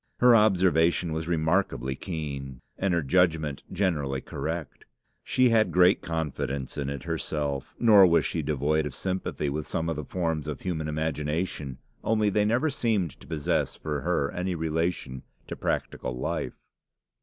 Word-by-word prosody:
Her 125 -1 +6
observation 90 -5 +3
was 80 +1 -3
remarkably 80 -5 +1
keen, 70 -5 -5
and 100 0 0
her 85 -2 +1
judgment 80 -2 +2
generally 75 -9 0
correct. 80 +3 -5 0.4
She 130 -1 +3
had 110 -2 +3
great 90 +2 +5
confidence 75 -5 -3
in 70 -1 -2
it 70 -2 -5
herself; 75 -4 -3
nor 105 -5 +7
was 85 -1 +3
she 80 - -1
devoid 75 +1 0
of 70 - -7
sympathy 95 -5 -2
with 75 +2 -3
some 80 0 -1
of 80 - -1
the 75 - -4
forms 80 -1 -2
of 75 -3 -4
human 80 -4 -2
imagination, 75 -2 -2 0.3
only 110 -2 +2
they 105 +1 +2
never 125 +8 +2
seemed 110 - 0
to - - -15
possess 80 -3 -1
for 75 -2 -3
her 80 -5 0
any 90 0 -2
relation 80 -5 -2 0.2
to - - -6
practical 65 0 -2
life. 65 - -3
80 Hz, 155 wpm, -27 LUFS, 75-90 Hz, 0.4 s, nor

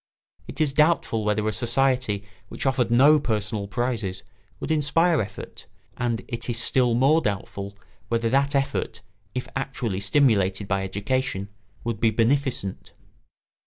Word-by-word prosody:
It - - -9
is 150 -3 +2
doubtful 150 -7 +2
whether 105 0 0
a - - +1
society 120 -2 +1 0.2
which - - -6
offered 130 -3 +1
no 140 +6 +6
personal 110 -4 -2
prizes 110 -4 -2 0.4
would - - -4
inspire 160 +1 +3
effort; 105 - -8 0.3
and 120 -2 -2
it 115 +1 -5
is 120 - -1
still 120 0 +3
more 140 +6 +4
doubtful 100 -2 -4 0.3
whether 115 0 0
that 140 +3 +2
effort, 135 0 -1 0.3
if 125 - -3
actually 130 -7 -3
stimulated 100 -4 +2
by 95 -1 0
education, 100 +1 -2 0.3
would 115 -3 -3
be 115 - +4
beneficent. 115 -2 -1
120 Hz, 135 wpm, -24 LUFS, 105-135 Hz, 0.4 s, no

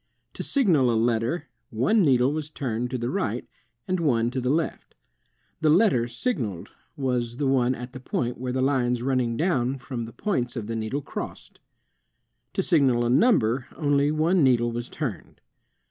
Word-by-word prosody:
To - - -6
signal 170 - +3
a 115 - +2
letter, 120 +7 0 0.2
one 130 - +2
needle 135 -4 +3
was 155 -1 -4
turned 125 -5 -3
to 130 - -2
the 120 +1 -2
right, 125 - -2 0.4
and 185 -1 0
one 120 -7 +1
to 130 0 -2
the 125 - -1
left. 160 +3 -2 0.6
The 155 -1 +2
letter 155 - +4
signaled 120 - -3 0.3
was 125 -3 -1
the 145 - -1
one 130 -1 +2
at 125 +1 -8
the 130 - -7
point 125 -1 -3
where 125 0 -3
lines 125 -2 +1
running 125 -3 0
down 135 -7 +1
from 125 -3 -5
the 115 - -9
points 130 - -2
of 115 -4 -4
the 115 +1 -4
needle 115 +6 -3
crossed. - - -7 0.9
To - - 0
signal 130 -7 +3
a 120 - +1
number 130 - +3
only 145 -1 +2
one 160 +3 +2
needle 120 -3 +3
was 120 +1 -5
turned. 125 - -5
130 Hz, 170 wpm, -25 LUFS, 120-150 Hz, 0.9 s, letter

